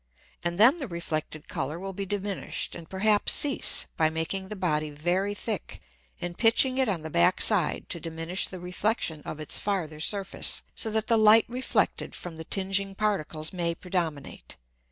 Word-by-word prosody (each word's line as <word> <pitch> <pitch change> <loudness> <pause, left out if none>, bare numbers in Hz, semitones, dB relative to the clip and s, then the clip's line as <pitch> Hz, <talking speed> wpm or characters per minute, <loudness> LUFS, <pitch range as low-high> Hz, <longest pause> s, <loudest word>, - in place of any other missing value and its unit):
And 175 0 -1
then 260 +10 +7
the 275 - -4
reflected 155 -4 -4
Colour 150 +4 -3
will 195 +2 -6
be 195 +1 -4
diminished, 200 -1 -3
and 165 - -9
perhaps 205 +2 +3
cease, 285 -2 +3
by 160 -1 +3
making 165 +4 -3
the 210 - -6
Body 155 -5 0
very 175 +7 -1
thick, 210 -3 -4 0.4
and 175 -1 -4
pitching 255 +4 +4
it 260 -4 +2
on 175 -6 -2
the 160 - -6
backside 85 -7 +2
to 170 - -5
diminish 165 +3 -3
the 185 - -7
Reflexion 180 -2 -2
of 155 - -6
its 155 - -1
farther 170 -7 -2
Surface, 195 +4 0
so 225 - -4
that 220 0 0
the 230 - +3
Light 215 +1 +7
reflected 250 +2 -1
from 170 -2 -7
the 160 - -6
tinging 195 +1 0
Particles 170 -7 -1
may 170 -2 -1
predominate. 165 -6 -4
185 Hz, 170 wpm, -27 LUFS, 160-205 Hz, 0.4 s, then